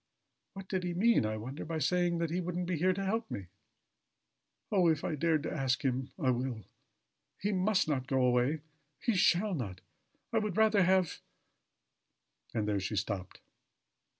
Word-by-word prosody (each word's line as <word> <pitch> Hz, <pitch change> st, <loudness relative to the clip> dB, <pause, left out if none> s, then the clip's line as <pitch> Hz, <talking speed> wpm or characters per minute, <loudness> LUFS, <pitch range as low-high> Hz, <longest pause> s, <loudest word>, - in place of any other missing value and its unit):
"What 195 Hz, -1 st, -9 dB
did 185 Hz, -2 st, -2 dB
he 175 Hz, -1 st, -2 dB
mean, 220 Hz, -, +4 dB
I 110 Hz, 0 st, -2 dB
wonder, 130 Hz, +7 st, -6 dB
by 165 Hz, 0 st, -3 dB
saying 175 Hz, +1 st, +1 dB
that 165 Hz, -1 st, -1 dB
he 180 Hz, +2 st, 0 dB
wouldn't 180 Hz, 0 st, -2 dB
be 180 Hz, 0 st, -1 dB
here 180 Hz, +4 st, +3 dB
to 195 Hz, +1 st, -2 dB
help 225 Hz, +3 st, -1 dB
me? 100 Hz, -, -5 dB, 1.3 s
Oh! 185 Hz, -4 st, +4 dB
if 155 Hz, -2 st, +2 dB
I -, -, -1 dB
dared 155 Hz, 0 st, +1 dB
to -, -, -3 dB
ask 135 Hz, 0 st, 0 dB
him! 130 Hz, 0 st, 0 dB
I 135 Hz, -8 st, +2 dB
will! 125 Hz, -3 st, -2 dB, 0.7 s
He 205 Hz, -, -1 dB
must 190 Hz, 0 st, +2 dB
not 130 Hz, -4 st, -1 dB
go 135 Hz, -2 st, +2 dB
away. 125 Hz, +5 st, +2 dB, 0.4 s
He 235 Hz, -, +1 dB
shall 190 Hz, +2 st, +3 dB
not. 100 Hz, -, -4 dB, 0.5 s
I 225 Hz, -, +4 dB
would 210 Hz, -3 st, -3 dB
rather 220 Hz, -2 st, +5 dB
have 185 Hz, -1 st, +2 dB, 0.7 s
" -, -, -41 dB
And 105 Hz, -2 st, 0 dB
there 105 Hz, -1 st, +1 dB
she 95 Hz, +3 st, -3 dB
stopped. 95 Hz, -1 st, -3 dB
165 Hz, 180 wpm, -32 LUFS, 130-185 Hz, 1.3 s, rather